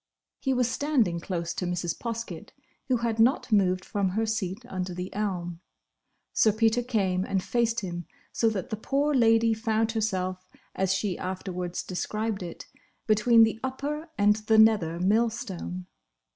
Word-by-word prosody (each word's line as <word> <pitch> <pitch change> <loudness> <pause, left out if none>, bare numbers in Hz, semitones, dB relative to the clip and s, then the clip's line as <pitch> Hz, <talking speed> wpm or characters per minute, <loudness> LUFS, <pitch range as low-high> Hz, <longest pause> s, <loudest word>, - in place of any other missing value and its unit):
He 270 - -1
was 250 -2 +2
standing 245 - +1
close 170 -1 -3
to 180 - -3
Mrs. 175 -1 -2
Poskett, 230 -1 -6 0.3
who 255 -2 +2
had 225 -1 -1
not 245 +2 +3
moved 185 -3 +3
from 200 -2 0
her 220 +5 0
seat 215 0 -3
under 185 -5 -4
the 180 +1 -5
elm. 180 -5 -3 0.7
Sir 215 - +4
Peter 225 +2 +2
came 195 -7 0
and 195 -2 -1
faced 235 -1 0
him, 175 -3 -5 0.3
so 225 - +2
that 195 -5 -4
the 215 - -2
poor 280 +6 0
lady 225 -2 +4
found 220 0 0
herself, 185 -4 -2 0.2
as 190 -1 0
she 195 -1 -1
afterwards 180 -1 -4
described 210 +3 -3
it, 175 -2 -7 0.4
between 225 +2 +5
the 220 0 +1
upper 290 +5 -3
and 205 0 +4
the 220 - +5
nether 210 -7 +4
millstone. 195 -3 -1
215 Hz, 155 wpm, -27 LUFS, 185-230 Hz, 0.7 s, between